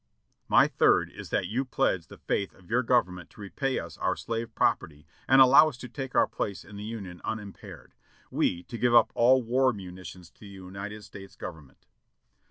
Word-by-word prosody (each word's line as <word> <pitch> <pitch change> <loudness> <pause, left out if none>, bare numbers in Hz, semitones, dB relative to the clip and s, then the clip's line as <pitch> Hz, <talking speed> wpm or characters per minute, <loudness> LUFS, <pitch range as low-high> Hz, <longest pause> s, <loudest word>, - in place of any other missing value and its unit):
"My - - +5
third - - +2
is - - -10
that - - 0
you 115 +9 -1
pledge 120 -10 -1
the - - -13
faith 100 - -2
of 90 0 -19
your 120 +2 +3
Government 90 -8 0
to - - -20
repay 130 +7 -2
us 85 -2 -6
for - - -22
our - - +1
slave 115 0 -5
property 75 -1 0 0.2
and 135 - +6
allow 135 +4 +8
us 135 - -11
to 125 - -8
take 130 +2 -7
our - - +5
place 100 -4 -5
in 100 - -12
the 100 - -7
Union 100 -5 -7
unimpaired; 105 -3 -8 0.4
we 85 0 0
to 115 - -8
give 120 -1 +3
up 115 - +6
all 130 +2 +4
war 130 +3 +2
munitions 90 -3 -10
to - - -33
the 105 - -12
United 100 +2 -8
States 95 0 -12
Government." 75 -6 -10
105 Hz, 195 wpm, -28 LUFS, 90-125 Hz, 0.4 s, allow